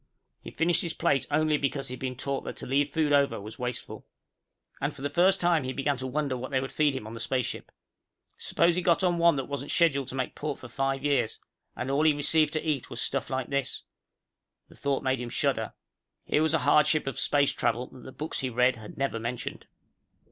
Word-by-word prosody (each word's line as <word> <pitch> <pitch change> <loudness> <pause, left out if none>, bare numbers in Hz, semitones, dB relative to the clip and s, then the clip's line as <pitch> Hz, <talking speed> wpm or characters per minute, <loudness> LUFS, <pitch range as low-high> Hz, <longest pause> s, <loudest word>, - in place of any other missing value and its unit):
He - - -8
finished 170 +1 +2
his 170 -2 -2
plate 135 - +1
only 155 +1 +2
because 140 0 -1
he - - -5
had 130 - -7
been 130 -1 -3
taught 135 +2 -2
that - - -5
to - - -6
leave 140 +2 +1
food 150 -1 +1
over 140 -1 +3
was 105 +2 -9
wasteful. 125 -1 -5 0.7
And - - -1
for 135 - -10
the 145 - -1
first 180 +5 +4
time 170 -4 +3
he 130 0 -3
began 140 0 0
to 130 +1 -4
wonder 140 0 -1
what 130 +1 -5
they 135 - +1
would 135 +1 -4
feed 150 -3 +2
him 120 - -5
on 110 - -8
the 115 - -7
spaceship. 125 +1 -2 0.6
Suppose 170 +1 +2
he 180 - 0
got 175 +1 +3
on 175 -2 +2
one 170 -2 +5
that 135 -2 -2
wasn't 140 0 -5
scheduled 140 -6 +2
to 130 - -6
make 130 -1 -2
port 150 -1 -4
for 130 - -10
five 135 +1 -1
years 130 -6 +1 0.4
and 135 - -3
all 140 +2 +2
he 155 -1 +5
received 150 +1 +2
to 155 0 -2
eat 145 -5 -1
was 120 - -5
stuff 135 +2 -1
like 130 -1 -2
this? 140 -2 -1 0.9
The - - -16
thought 140 -1 -1
made 130 -1 0
him 120 - -4
shudder. - - 0 0.5
Here 150 - +2
was 160 0 +3
a 160 - 0
hardship 150 0 +4
of 135 -4 -3
space 145 -1 +3
travel 120 +1 0
that 125 - -14
the 130 - -10
books 155 +4 -3
he 130 - -1
read 125 +1 +3
had 110 -1 -11
never 135 -4 -1
mentioned. 120 +2 -5
140 Hz, 230 wpm, -28 LUFS, 130-150 Hz, 0.9 s, one